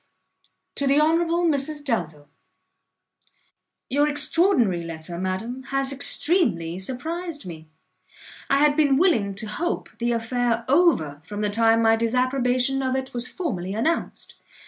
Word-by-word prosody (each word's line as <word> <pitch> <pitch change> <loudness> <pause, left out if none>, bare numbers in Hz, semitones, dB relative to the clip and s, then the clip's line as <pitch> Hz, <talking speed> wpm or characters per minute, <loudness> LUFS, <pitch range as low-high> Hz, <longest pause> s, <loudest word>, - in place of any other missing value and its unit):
To 280 - 0
the 280 +2 +4
Honourable 335 +2 +2
Mrs 295 -1 0
Delvile. 160 - -3 1.6
Your 290 +2 +2
extraordinary 290 - +2
letter, 165 +1 -7
madam, 190 +8 -4
has 275 0 +1
extremely 265 - +1
surprised 315 - -5
me. 160 -3 -10 0.8
I 275 - +3
had 290 0 +3
been 285 -3 +3
willing 235 - +2
to 215 - -3
hope 265 +12 -3
the 240 0 0
affair 235 0 -1
over 255 - +2
from 205 +4 -6
the 210 -1 -1
time 225 +1 +3
my 225 0 +5
disapprobation 255 +2 +1
of 260 -1 -1
it 265 0 -4
was 245 0 -3
formally 200 - -4
announced. 315 +10 -2
255 Hz, 130 wpm, -23 LUFS, 205-295 Hz, 1.6 s, my